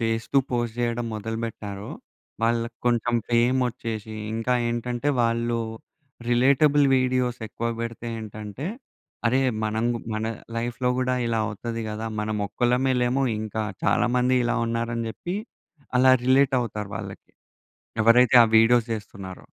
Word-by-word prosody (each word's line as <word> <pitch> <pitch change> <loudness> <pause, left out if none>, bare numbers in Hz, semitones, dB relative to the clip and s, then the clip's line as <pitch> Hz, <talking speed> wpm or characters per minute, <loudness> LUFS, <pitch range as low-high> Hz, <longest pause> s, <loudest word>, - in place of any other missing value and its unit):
చేస్తూ 115 +3 -1
పోస్ట్ 120 -2 -1
చేయడం 120 0 -1
మొదలు 110 +1 -4
బెట్టారో, 105 -3 -6 0.5
వాళ్ళకి 115 0 0
కొంచెం 120 0 +2 0.2
ఫేమొచ్చేసి, 120 -3 0 0.2
ఇంకా 115 +2 0
ఏంటంటే, 120 +3 -2
వాళ్ళు 115 0 0 0.7
రిలేటబుల్ 140 +4 +4
వీడియోస్ 125 -1 +1
ఎక్కువ 115 - -4
పెడితే 115 0 -5
ఏంటంటే, 110 +4 -7 0.6
అరె! 130 +3 +3 0.2
మనం‌గు 115 +2 0 0.2
మన 110 +1 -2 0.3
లైఫ్‌లో 120 +2 -1
కూడా 125 0 +1
ఇలా 115 -1 0
అవుతది 115 +2 -4
కదా! 105 +1 -5 0.2
మనం 110 0 -2
ఒక్కళ్ళమే 125 +4 +1
లేము, 125 +3 +1 0.2
ఇంకా 110 0 -3 0.2
చాలా - - +3
మంది 125 +1 +3
ఇలా 120 +1 +1
ఉన్నారని 115 0 -2
చెప్పి, 175 +10 -5 0.6
అలా 130 +1 +6
రిలేట్ 135 +1 +4
అవుతారు 105 -4 -4
వాళ్ళకి. - - -8 0.7
ఎవరైతే 120 +2 +5
ఆ - - +5
వీడియోస్ 115 +1 +4
చేస్తున్నారో. 95 -3 -8
115 Hz, 125 wpm, -25 LUFS, 110-125 Hz, 0.7 s, అలా